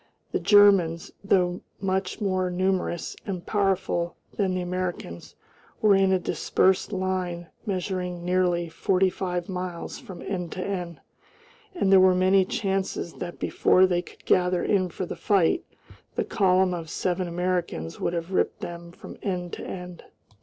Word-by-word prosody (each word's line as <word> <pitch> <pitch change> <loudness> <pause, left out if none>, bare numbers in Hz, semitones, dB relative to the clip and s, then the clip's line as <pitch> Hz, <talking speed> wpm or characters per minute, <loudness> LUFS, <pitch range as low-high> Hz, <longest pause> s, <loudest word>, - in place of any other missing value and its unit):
The - - 0
Germans, 195 -6 +5
though 180 -2 +2 0.2
much 190 -1 -1
more 185 -2 +1
numerous 180 -2 -1
and 185 -3 -4
powerful 190 -4 0 0.2
than 190 -3 0
the 185 - -1
Americans, 175 - -4 0.4
were 210 -2 +5
in 195 -1 +4
a 190 - +4
dispersed 190 +2 +1
line 185 -3 -2 0.2
measuring 180 -2 -3
nearly 180 -1 +1
forty 185 +3 +1
five 180 -2 -3
miles 180 -2 -5
from 185 -3 -10
end 180 -4 -4
to 185 - -4
end, 180 -4 -4 0.7
and 195 - +1
there 195 - +8
were 185 0 +6
many 185 +1 +4
chances 195 -4 -2
that 175 -1 -5
before 185 - +4
they 175 -2 +1
could - - -17
gather 180 -1 +2
in 185 -3 +2
for 180 - -4
the - - -6
fight 200 - +2 0.5
the - - 0
column 185 -2 +3
of 165 -2 -5
seven 180 +2 -1
Americans 175 - -2
would - - -1
have 170 +1 -3
ripped 185 - 0
them 170 0 -7
from - - -11
end 180 -3 -3
to - - -6
end. 180 -2 -7
185 Hz, 155 wpm, -26 LUFS, 175-190 Hz, 0.7 s, there